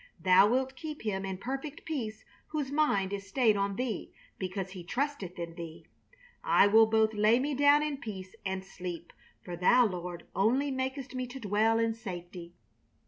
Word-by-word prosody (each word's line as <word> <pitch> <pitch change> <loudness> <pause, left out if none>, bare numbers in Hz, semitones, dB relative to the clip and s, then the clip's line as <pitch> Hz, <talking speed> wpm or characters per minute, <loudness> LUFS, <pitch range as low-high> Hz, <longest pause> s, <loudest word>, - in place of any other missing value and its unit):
Thou 185 +2 +6
wilt 260 +2 0
keep 305 +1 -7
him 195 -3 -2
in 190 -1 -4
perfect 270 +7 -5
peace 225 -9 -4 0.2
whose 295 -3 -3
mind 205 -11 +1
is 200 0 -5
stayed 220 0 +3
on 200 0 0
Thee 245 -1 -3 0.3
because 190 0 -4
he 185 -2 -8
trusteth 245 - -3
in 170 -1 -5
Thee. 165 -1 -9 0.6
I - - +5
will 220 +2 +6
both 220 0 +3
lay 215 +2 +4
me 285 +3 -1
down 285 +2 +5
in 300 -2 -2
peace 190 -7 -7
and 190 -1 -3
sleep, 180 -3 -7 0.3
for 175 - -5
Thou 240 +8 +5
Lord 180 -3 -4
only 255 +8 +2
makest 260 0 -3
me 255 -1 -3
to 255 +2 -8
dwell 220 +1 +2
in 230 0 +1
safety...." 175 -5 -8
215 Hz, 175 wpm, -30 LUFS, 190-260 Hz, 0.6 s, Thou